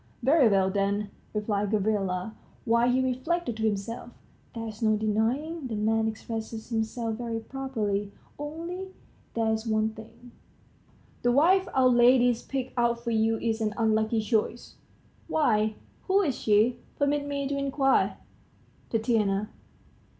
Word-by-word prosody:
"Very 270 -2 +5
well, 190 -2 +3
then," 200 +1 0 0.2
replied 210 -1 -1
Gavrila, 205 -2 0 0.3
while 235 +1 +3
he 260 +1 +2
reflected 260 +1 -1
to 220 - -3
himself: 215 +3 -3 0.5
"There's 225 -1 -6
no 215 -1 +3
denying 245 +9 -1
the 225 - -4
man 220 +1 +1
expresses 220 0 -5
himself 225 0 -2
very 230 -2 -3
properly. 220 -6 -3 0.3
Only 335 +6 -5 0.5
there's 220 0 0
one 215 0 +2
thing," 220 0 -10
he 230 +2 -17
pursued - - -30
aloud: - - -31
"the 245 - +3
wife 355 +9 +4
our 260 -1 +5
lady's 245 -1 +5
picked 260 -1 -4
out 235 0 +2
for 235 - -2
you 225 0 +2
is 225 0 -1
an 215 -1 -1
unlucky 220 0 +2
choice." 220 +1 -1 0.5
"Why, 215 -8 +2 0.3
who 395 +1 +4
is 280 -8 0
she, 215 +3 +2 0.2
permit 285 0 +1
me 280 -1 -2
to 280 - -2
inquire?" 275 -1 +1 0.7
"Tatiana." 215 -3 +1
225 Hz, 140 wpm, -27 LUFS, 215-260 Hz, 0.7 s, Very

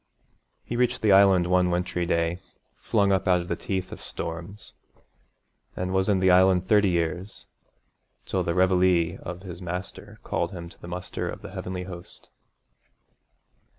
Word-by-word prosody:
He 120 - -5
reached 125 -1 0
the 105 - +4
Island 95 -2 +6
one 90 0 +3
wintry 90 0 -1
day, 85 0 0 0.4
flung 100 -2 +1
up 95 -1 +1
out 90 -1 +4
of 85 - -9
the - - 0
teeth 95 -2 -4
of - - -9
storms, 85 +5 -7 1.0
and 90 +1 -3
was 95 +1 +1
in 100 - +3
the 95 0 +4
Island 90 0 +4
thirty 105 -1 +4
years, 85 +3 -2 0.8
till - - -1
the 85 - -1
reveille 90 -2 +3
of 90 +1 -7
his 90 -1 -8
Master 90 +2 -7
called 85 +3 -2
him 85 -2 -7
to - - -19
the - - -9
muster 90 +1 -4
of - - -8
the - - -8
Heavenly 90 0 -5
host. 90 -2 -11
90 Hz, 160 wpm, -26 LUFS, 85-95 Hz, 1.0 s, Island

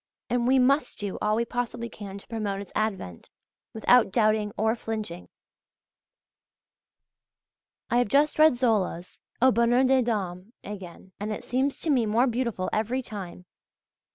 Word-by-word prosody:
And 245 0 +1
we 265 +1 +4
must 275 +4 +2
do 205 -2 -5
all 210 0 +2
we 235 +1 0
possibly 240 0 -3
can 200 -3 -9
to 200 - -13
promote 210 -4 -3
its 200 - -9
advent, 190 - -3 0.4
without 225 -1 +4
doubting 215 -1 +2
or 220 +2 +1
flinching. 215 -7 -5 2.6
I 240 - +4
have 245 - +2
just 290 +7 +2
read 310 -4 +6
Zola's 210 -8 -1 0.2
"Au 260 - +7
Bonheur 240 +2 +3
des 265 0 +4
Dames" 200 -4 -3
again; 190 -2 -9
and 210 +1 -3
it 215 - -5
seems 265 +3 -1
to 320 - 0
me 245 -5 +2
more 230 +4 +3
beautiful 235 -6 -1
every 235 +5 -1
time. 190 -5 -8
225 Hz, 150 wpm, -26 LUFS, 200-245 Hz, 2.6 s, Au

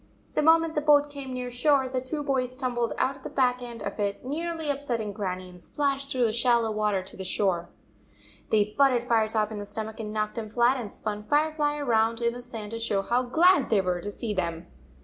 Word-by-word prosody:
The - - +2
moment 325 +1 +4
the 300 - 0
boat 290 -1 +4
came 280 -2 -6
near 250 -1 -4
shore, 265 +2 +3
the 255 0 -2
two 290 +4 -4
boys 255 -3 -1
tumbled 245 -3 -1
out 270 +1 0
of - - -18
the - - -6
back 250 -2 +1
end 240 -1 -7
of - - -5
it, 200 +3 -2
nearly 320 +2 -2
upsetting 240 -7 -3
Grannie, 185 -3 -4
and 180 -1 -14
splashed 275 +4 -1
through 255 -3 +2
the 225 - +1
shallow 235 -1 +2
water 210 -3 0
to 190 - -11
the 190 - -6
shore. 185 -2 0 0.8
They 210 -1 +2
butted 265 -4 +4
Firetop 220 -3 +1
in 215 - -5
the 205 - -6
stomach 220 +2 -5
and 210 -1 -4
knocked 215 +1 -2
him 215 -1 -6
flat, 240 +3 +3
and 220 -5 -5
spun 210 -1 -5
Firefly 295 +1 +1
around 230 -5 +1
in 235 0 +1
the 245 - -7
sand 225 -4 -8
to 230 - -4
show 205 -4 0
how 240 +5 +1
glad 315 +5 +4
they 215 - +4
were 180 -2 -1
to 205 - -5
see 210 +1 -4
them. 170 -4 -2
240 Hz, 225 wpm, -27 LUFS, 210-275 Hz, 0.8 s, moment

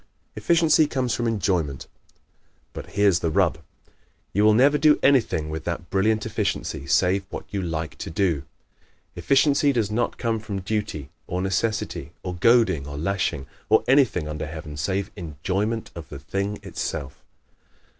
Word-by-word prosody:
Efficiency 160 -2 +4
Comes 125 -4 -1
from 120 +1 -1
Enjoyment 90 - -1 0.3
¶ - - -44 0.6
But - - -7
here's 100 -4 +4
the 85 - 0
rub. 85 -2 +2 0.7
You 105 - +2
will 105 0 +6
never 140 +5 +4
do 150 0 +5
anything 115 - +3
with 80 +1 -5
that 85 0 -4
brilliant 105 +3 +2
efficiency 105 -10 -2
save 95 +6 +2
what - - -6
you 100 - -1
LIKE 80 -3 -4
TO - - -5
DO. 80 -3 0 0.7
Efficiency 140 +1 +3
does 115 -5 0
not 120 +3 -1
come 115 -2 -1
from 100 -2 -5
duty, 90 -8 -3 0.2
or 90 - -2
necessity, 95 +4 -2
or 90 - -4
goading, 95 - +3
or 70 0 -6
lashing, 85 -4 -1 0.2
or - - +5
anything 125 - +3
under 75 0 -4
heaven 80 -1 -8
save 95 +7 -2
ENJOYMENT 95 +6 -3
OF 85 -1 -9
THE 70 - -7
THING 100 +8 -3
ITSELF. 70 -1 -5
100 Hz, 155 wpm, -24 LUFS, 80-115 Hz, 0.7 s, will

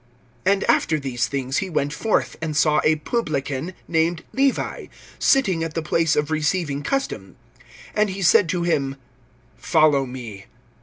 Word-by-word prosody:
(27)And 195 0 +3
after 155 -1 +2
these 130 -3 -2
things 135 -1 -2
he 190 - -1
went 145 -3 -1
forth, 220 +6 0
and 155 -2 -2
saw 150 0 +3
a 155 - +4
publican, 155 - -3
named 165 0 0
Levi, 270 0 0 0.3
sitting 190 -12 +3
at 165 -1 -5
the 165 - -1
place 165 0 +1
of 150 +1 0
receiving 155 -2 0
custom; 275 - -3 0.6
and 210 -1 +2
he 195 +1 -4
said 170 +1 +5
to 175 +1 -1
him: 140 -5 0 0.6
Follow 150 -4 +3
me. 115 -6 -8
155 Hz, 150 wpm, -22 LUFS, 140-180 Hz, 0.6 s, said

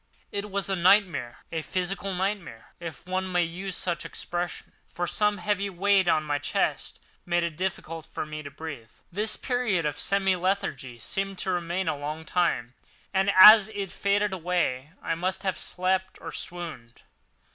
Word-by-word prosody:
It 205 +1 -3
was 200 0 -1
as 195 - 0
a - - -4
nightmare—a 170 - +2
physical 185 +4 -2
nightmare, 185 - -3
if 165 -5 -7
one 185 0 -2
may 180 -1 +3
use 180 +3 -4
such 175 -2 -2
an - - -7
expression; 175 0 -4
for 175 - -4
some 210 +3 +1
heavy 200 +1 0
weight 195 0 +3
on 155 -2 +3
my 145 -1 -1
chest 145 -1 -1 0.2
made 175 0 +1
it 170 -2 -2
difficult 165 -2 -4
for - - -4
me 155 0 -6
to 145 - -7
breathe. 145 -6 -8 0.2
This 210 +4 0
period 245 - 0
of 150 -1 -2
semi 195 -1 +2
lethargy 175 -9 -2
seemed 195 - -3
to 190 - -1
remain 175 +1 -1
a - - +1
long 150 +3 -5
time, 145 -10 0 0.4
and 195 +1 +3
as 215 +2 +11
it 195 -2 -3
faded 200 0 +1
away 170 -7 -1
I - - 0
must 185 +3 -1
have 190 -2 0
slept 185 +1 -1
or - - -7
swooned. 160 -10 -7
180 Hz, 170 wpm, -27 LUFS, 160-195 Hz, 0.4 s, as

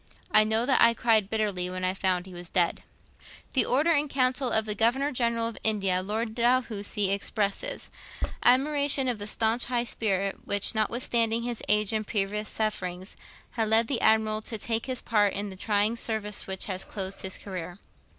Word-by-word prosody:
I 215 - +7
know 220 +2 +1
that 265 -1 +3
I 235 0 +6
cried 220 -4 +2
bitterly 205 -5 -1
when 185 0 -5
I 185 0 +1
found 185 -2 -1
he 190 - -12
was 175 -1 -7
dead.' 175 -2 0 0.7
The 265 - +4
Order 295 +7 +2
in 300 -2 +2
Council 255 -1 +1
of 220 -1 +2
the 210 - -2
Governor 245 +7 +1
General 235 -2 +1
of 230 - -7
India, 195 -4 +1
Lord 220 +3 -3
Dalhousie, 225 -5 +1
expresses 200 0 -2 0.5
'admiration 280 +1 +3
of 240 -4 -2
the 205 - -5
staunch 225 +2 +2
high 240 -1 0
spirit 195 -4 -1
which, 205 +2 +1
notwithstanding 230 +1 0
his 240 -1 -3
age 210 0 +2
and 215 -1 -2
previous 210 0 -2
sufferings, 190 -3 -3 0.4
had 225 -2 -1
led 220 +2 +4
the 240 -2 -1
Admiral 220 0 +3
to 220 +1 -3
take 225 +3 -3
his 255 -2 -2
part 205 -3 +2
in 200 0 -4
the - - -8
trying 210 +3 0
service 215 -3 -2
which 190 -1 -3
has 185 -2 -3
closed 195 -1 -5
his 190 0 0
career.' 180 -2 -7
220 Hz, 180 wpm, -27 LUFS, 200-235 Hz, 0.7 s, I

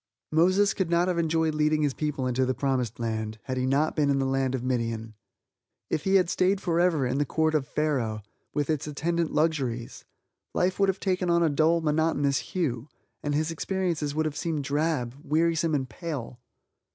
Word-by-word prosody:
Moses 185 +6 +4
could 190 -4 -1
not 170 +1 +3
have 180 -2 0
enjoyed 160 -1 +1
leading 150 0 +2
his 145 -2 +1
people 150 -3 -2
into 130 +1 +1
the 130 0 0
promised 125 -4 -1
land, 110 -1 -3
had 130 -2 -3
he 130 0 0
not 145 +4 +1
been 145 -2 +2
in 140 - +3
the 135 - +1
land 135 -1 0
of 125 - -4
Midian. 115 -3 -2 0.8
If 155 - -1
he 195 0 +3
had 185 -2 +5
stayed 185 +3 +2
forever 170 -5 +2
in 130 +3 0
the - - +3
Court 160 +2 0
of 145 -4 0
Pharaoh, 125 -9 -1 0.3
with 145 -2 -1
its 155 -2 -1
attendant 165 +3 -1
luxuries, 135 -7 -1 0.5
life 185 +2 +1
would 195 -1 +4
have 190 - -1
taken 185 -2 0
on 170 0 +4
a 165 - +3
dull, 160 +3 +3
monotonous 150 -3 +1
hue, 135 -9 -2 0.3
and 145 -1 -1
his 155 +2 0
experience 180 0 -1
would 155 0 +1
have 155 -2 -2
seemed 160 -4 -2
drab, 140 -3 0
wearisome 160 +1 +1
and 135 -2 -1
pale. 140 -6 -6
150 Hz, 190 wpm, -27 LUFS, 130-165 Hz, 0.8 s, had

